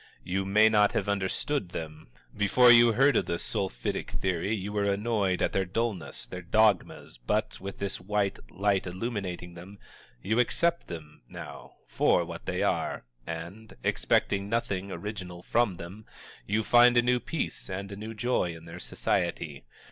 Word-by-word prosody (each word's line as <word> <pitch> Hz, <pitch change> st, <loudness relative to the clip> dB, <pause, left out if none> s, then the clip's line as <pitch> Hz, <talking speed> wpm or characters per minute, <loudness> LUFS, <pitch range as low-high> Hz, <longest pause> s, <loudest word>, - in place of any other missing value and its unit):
You 95 Hz, +2 st, -1 dB
may 105 Hz, +3 st, +5 dB
not 105 Hz, -2 st, +4 dB
have -, -, -1 dB
understood 100 Hz, +4 st, -1 dB
them; 80 Hz, -2 st, -7 dB, 0.3 s
before 120 Hz, +4 st, +6 dB
you 120 Hz, -1 st, +7 dB
heard 135 Hz, +5 st, +4 dB
of -, -, +2 dB
the 85 Hz, -, -1 dB
Sulphitic 95 Hz, -8 st, -3 dB
Theory 95 Hz, +1 st, -1 dB
you 100 Hz, 0 st, -5 dB
were 105 Hz, -1 st, +1 dB
annoyed 100 Hz, -3 st, 0 dB
at -, -, +1 dB
their 95 Hz, -, +2 dB
dullness, 100 Hz, 0 st, -3 dB
their 90 Hz, -, -7 dB
dogmas, 95 Hz, -, +1 dB
but, -, -, -1 dB
with 100 Hz, +1 st, -6 dB
this 100 Hz, -2 st, -3 dB
white 100 Hz, +1 st, -1 dB
light 100 Hz, 0 st, 0 dB
illuminating 95 Hz, -3 st, -4 dB
them, 90 Hz, +4 st, -11 dB, 0.4 s
you 110 Hz, -, 0 dB
accept 170 Hz, +7 st, +1 dB
them, 80 Hz, -3 st, -9 dB
now, -, -, -10 dB
for -, -, +2 dB
what -, -, -9 dB
they -, -, 0 dB
are, -, -, -1 dB, 0.2 s
and, 85 Hz, +7 st, -7 dB
expecting 100 Hz, 0 st, +1 dB
nothing 100 Hz, -4 st, -1 dB
original 95 Hz, -4 st, -6 dB
from 120 Hz, -6 st, +1 dB
them, 95 Hz, +6 st, -10 dB, 0.4 s
you 110 Hz, +2 st, +1 dB
find 120 Hz, +2 st, +6 dB
a 120 Hz, -, +6 dB
new 125 Hz, 0 st, +3 dB
peace 155 Hz, -4 st, -4 dB
and 100 Hz, +1 st, -5 dB
a -, -, -5 dB
new 110 Hz, +2 st, -7 dB
joy 105 Hz, -7 st, 0 dB
in 80 Hz, 0 st, -12 dB
their 85 Hz, +1 st, -9 dB
society. 80 Hz, -8 st, -2 dB
100 Hz, 165 wpm, -28 LUFS, 90-110 Hz, 0.4 s, you